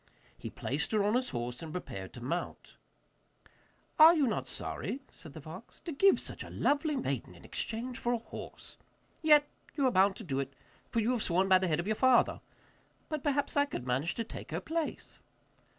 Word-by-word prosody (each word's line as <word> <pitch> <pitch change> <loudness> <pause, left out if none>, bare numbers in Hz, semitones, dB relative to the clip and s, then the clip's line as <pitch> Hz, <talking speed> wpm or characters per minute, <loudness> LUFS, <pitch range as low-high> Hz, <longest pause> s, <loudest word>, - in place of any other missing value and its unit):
He - - -7
placed 150 - -2
her 210 -2 +3
on 205 +1 +2
his 250 +1 +1
horse 120 0 -4
and 160 -1 -7
prepared 100 - -6
to 120 - -9
mount. 170 +8 -4 1.2
'Are 320 +2 +10
you 300 -4 +3
not 225 - -1
sorry,' 275 - -4
said - - -9
the - - -9
fox, - - -11
'to 340 - -6
give 390 +7 +5
such - - -6
a - - -10
lovely 295 +1 +1
maiden 135 - -3
in 85 - -15
exchange 245 +3 -3
for 240 - 0
a 240 - +2
horse? 230 - -9 0.4
Yet 300 -2 +6 0.3
you 280 - +2
are 255 - +4
bound 190 -1 +4
to 220 - -9
do 135 -7 -2
it, 135 0 -4 0.3
for 230 - +1
you 225 +3 +2
have 245 -3 0
sworn 185 +1 +2
by 190 -1 +6
the 185 - 0
head 155 -2 +1
of 170 - -2
your 215 +1 +1
father. 260 +1 +4 0.7
But 310 -2 -2
perhaps 285 0 0
I 285 0 +4
could 205 - -6
manage 130 +7 0
to 230 - -1
take 225 - -9
her - - -2
place. 325 0 -4
225 Hz, 205 wpm, -32 LUFS, -, 1.2 s, Are